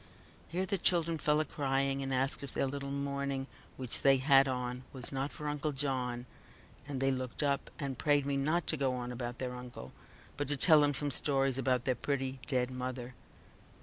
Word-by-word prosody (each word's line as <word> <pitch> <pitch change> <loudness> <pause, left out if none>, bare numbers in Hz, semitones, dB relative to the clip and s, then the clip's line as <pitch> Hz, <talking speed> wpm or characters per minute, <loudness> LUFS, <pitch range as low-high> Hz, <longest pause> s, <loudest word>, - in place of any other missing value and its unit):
Here 180 +3 -1
the 195 0 -1
children 170 -2 +2
fell 150 0 +3
a - - -1
crying, 135 -1 0
and 135 0 -3
asked 135 +1 0
if 140 -3 -7
their - - +2
little 140 +1 -4
mourning 140 -1 -2 0.3
which 130 -3 -1
they 135 -1 +6
had 135 +1 +6
on 125 -1 -3
was 130 -3 -6
not 135 +1 -2
for 150 - -6
uncle 150 0 -1
John, 130 -3 -1 0.6
and 140 -2 -3
they 135 +1 +3
looked 130 +2 -3
up, 140 -1 0
and 135 -5 -4
prayed 145 -2 +3
me 140 0 0
not 155 +5 +1
to 155 - +1
go 135 -2 +1
on 125 -1 -4
about 120 0 -4
their 125 -1 -3
uncle, 125 - -9 0.4
but 145 - -1
to 145 0 -1
tell 155 +1 +6
them 145 -1 +3
some 145 +1 -1
stories 135 -1 +2
about 125 -2 +1
their 130 - +3
pretty 135 +1 -2
dead 125 -3 +1
mother. 125 -1 -4
135 Hz, 200 wpm, -33 LUFS, 130-145 Hz, 0.6 s, they